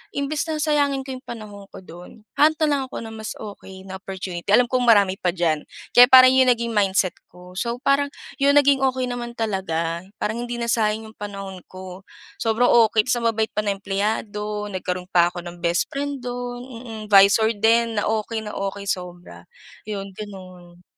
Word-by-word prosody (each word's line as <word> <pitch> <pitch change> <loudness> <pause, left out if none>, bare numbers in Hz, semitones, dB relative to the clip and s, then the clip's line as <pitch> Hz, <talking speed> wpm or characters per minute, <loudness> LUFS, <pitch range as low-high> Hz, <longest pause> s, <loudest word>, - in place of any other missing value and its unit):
imbes 280 +2 -2
na 315 - -2
sayangin 290 -3 +1
ko 265 - -8
yung 255 - -31
panahon 210 -4 -9
ko 190 - -13
do’n, 180 +5 -13 0.2
hahanap 310 +2 +5
na - - +6
lang 285 -1 +1
ako - - -11
na 225 - -8
mas 220 0 -7
okey 190 -2 -10
na 190 0 -8
opportunity. 185 -2 -7
Alam 245 -1 +2
kong 250 -1 +1
marami 200 -4 +4
pa 180 -1 -1
diyan. 165 -4 0 0.2
Kaya 245 0 +8
parang 255 0 +8
yun 260 0 +4
naging 235 -1 +1
mindset 195 -3 +1
ko. 180 +1 -15
So 235 +2 -2
parang, 280 +1 +3 0.3
yun 280 +1 +4
naging 285 -1 +5
okey 260 -1 0
naman 240 -1 -6
talaga. 170 -7 -2 0.2
Parang 235 +4 -3
hindi 240 - -4
na 235 -1 -2
sayang 220 -1 0
yung - - -28
panahon 195 -2 -7
ko. 185 +1 -11 0.3
Sobrang 225 +2 +2 0.2
okey, 215 0 +2
tapos 245 0 0
ang 235 - 0
babait 220 0 -1
pa 210 - -3
ng 200 - +1
empleyado, 210 +1 -2
nagkaroon 180 -1 -4
pa 175 -1 +5
ako 175 0 -6
ng 175 0 -9
bestfriend 265 +11 -2
do’n. 245 0 -5
Mm. 230 -2 -8
'Visor 200 +3 +6
din, 225 0 +3
na - - -1
okey 220 +1 -1
na 210 - -6
okey 200 0 -4
sobra. 175 - -5 0.4
Yun, 200 -2 -6
gano’n. 185 -4 -11
215 Hz, 190 wpm, -22 LUFS, 190-245 Hz, 0.4 s, Kaya